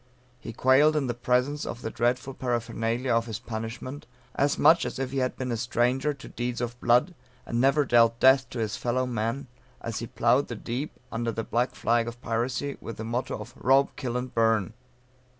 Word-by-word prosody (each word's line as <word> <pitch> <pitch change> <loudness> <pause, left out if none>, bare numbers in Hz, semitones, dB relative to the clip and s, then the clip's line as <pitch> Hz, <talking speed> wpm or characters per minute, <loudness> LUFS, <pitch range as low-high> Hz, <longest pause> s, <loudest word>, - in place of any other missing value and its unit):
He 115 - -7
quailed 135 +6 +4
in 150 -3 +1
the 120 - -1
presence 125 +4 0
of 120 - -6
the 110 - -3
dreadful 125 +3 0
paraphernalia 120 0 -1
of 115 0 +1
his 110 -2 -4
punishment, 115 +5 -6 0.3
as 140 +1 +1
much 160 +3 +6
as - - -4
if 130 -1 -3
he 135 - -1
had 130 -1 -1
been 130 -1 -3
a 115 - -1
stranger 125 +4 +1
to 140 -2 -10
deeds 120 0 -3
of 120 0 -4
blood, 125 +10 +3 0.3
and 120 0 -1
never 140 +2 +4
dealt 115 -2 +4
death 130 0 +5
to 125 - -7
his 110 -3 -1
fellow 125 +1 0
man 120 +2 -2 0.3
as - - -4
he - - -5
ploughed - - +2
the - - -5
deep, 130 +6 -4 0.2
under 115 +1 -1
the 115 0 -3
black 120 +3 -1
flag 115 0 +1
of 120 0 -7
piracy, 125 +4 -2
with 115 - -7
the 110 - -5
motto 120 +3 -2
of 110 +3 -9
"Rob, 135 +2 +3
Kill, 125 -3 -3
and 125 0 -5
Burn." 110 -4 +2
120 Hz, 205 wpm, -27 LUFS, 115-130 Hz, 0.3 s, much